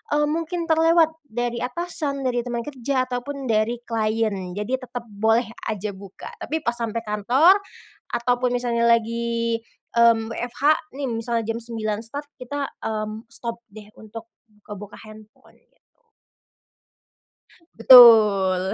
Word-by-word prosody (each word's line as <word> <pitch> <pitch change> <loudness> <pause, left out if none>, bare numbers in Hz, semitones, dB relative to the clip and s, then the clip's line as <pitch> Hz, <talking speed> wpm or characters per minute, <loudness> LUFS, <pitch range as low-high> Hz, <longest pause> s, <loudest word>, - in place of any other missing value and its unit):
eee, 295 - +2
mungkin 335 +2 -2
terlewat, 325 0 +3 0.2
dari 240 0 -3
atasan, 280 0 -3
dari 245 -2 0
teman 240 -1 -4
kerja, 265 -1 -2
ataupun 255 +2 -5
dari 230 +3 0
klien 215 -5 -2
jadi 240 +6 -2
tetep 245 -2 -7
boleh 225 +3 +1 0.2
aja 210 -1 -3
buka, 195 0 -11
tapi 315 0 -4
pas 235 - +1
sampai 230 -1 -2
kantor, 245 - +3 0.6
ataupun 245 +1 0
misalnya 235 -1 0
lagi, 230 0 0 0.4
mmm, 230 -1 +4
WFH 245 +3 -6 0.3
nih 280 - -3
misalnya 230 0 -2
jam 225 +1 -3
9.00 220 -2 -3
start, 285 +6 -6
kita, 280 +3 -4 0.2
mmm, 215 0 -4
stop 235 0 -6
deh 210 0 -13
untuk, 220 +1 -11 0.2
buka-buka 210 -1 -11
handphone 215 0 -17
gitu. - - -39 2.0
Betul. 210 -6 +7
235 Hz, 125 wpm, -23 LUFS, 215-255 Hz, 2.0 s, Betul